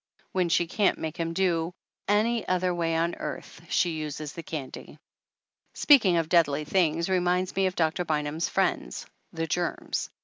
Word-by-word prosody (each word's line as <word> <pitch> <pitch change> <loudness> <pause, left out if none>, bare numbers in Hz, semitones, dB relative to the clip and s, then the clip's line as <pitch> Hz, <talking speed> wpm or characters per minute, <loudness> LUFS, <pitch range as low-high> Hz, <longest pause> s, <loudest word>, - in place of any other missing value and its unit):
When 180 -2 +1
she 170 +1 +3
can't 195 +4 +1
make 160 0 -4
him 165 -1 -2
do 170 -1 0 0.3
any 220 +3 +1
other 185 0 +1
way 165 -1 0
on 170 +1 +1
earth - - -7
she 175 - +2
uses 155 -1 -5
the 170 - -6
candy. 150 -5 -7 0.8
Speaking 220 - +5
of 165 -1 0
deadly 155 -3 +2
things 165 -1 +1
reminds 180 0 +1
me 195 0 +2
of 185 - -4
Doctor 160 +1 +1
Bynum's 155 0 -1
friends, - - -1 0.3
the 165 0 -3
germs. 175 +2 -2
170 Hz, 160 wpm, -27 LUFS, 160-185 Hz, 0.8 s, Speaking